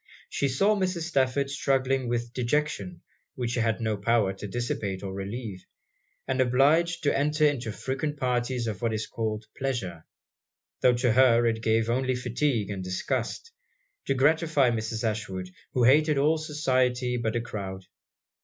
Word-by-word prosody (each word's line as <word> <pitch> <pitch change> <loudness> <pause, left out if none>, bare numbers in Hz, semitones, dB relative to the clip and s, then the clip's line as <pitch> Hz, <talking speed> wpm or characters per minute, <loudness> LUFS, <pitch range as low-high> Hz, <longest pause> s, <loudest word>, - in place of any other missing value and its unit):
She 140 - 0
saw 195 +11 +2
Mrs. 185 -3 -1
Stafford 140 -3 0
struggling 135 -2 +1
with 120 0 -2
dejection 150 +8 -1 0.3
which 125 -3 -2
she 120 - -1
had 115 -1 +1
no 110 -2 -1
power 100 -1 +2
to 105 - -7
dissipate 100 -3 -3
or 95 -1 -4
relieve, 100 0 -6 0.6
and 130 0 +1
obliged 150 +8 +3
to 145 - +2
enter 150 +2 +2
into 130 -6 0
frequent 135 +6 -3
parties 125 -1 -1
of 105 -4 -4
what 115 -2 0
is 110 - -2
called 110 -1 -3
pleasure, 95 -12 -3 0.7
tho' 125 - +5
to 120 0 +2
her 120 -2 +5
it 115 -1 0
gave 110 0 +2
only 130 +2 +1
fatigue 120 -3 -1
and 95 -2 -4
disgust, 95 - -3 0.6
to 135 - +1
gratify 145 -1 +3
Mrs. 110 0 -3
Ashwood, 95 -4 -4 0.2
who 125 - +2
hated 150 +4 +5
all 155 +3 +3
society 130 -5 0
but 115 -1 -1
a 120 - +1
crowd. 95 -5 -6
125 Hz, 155 wpm, -27 LUFS, 110-140 Hz, 0.7 s, tho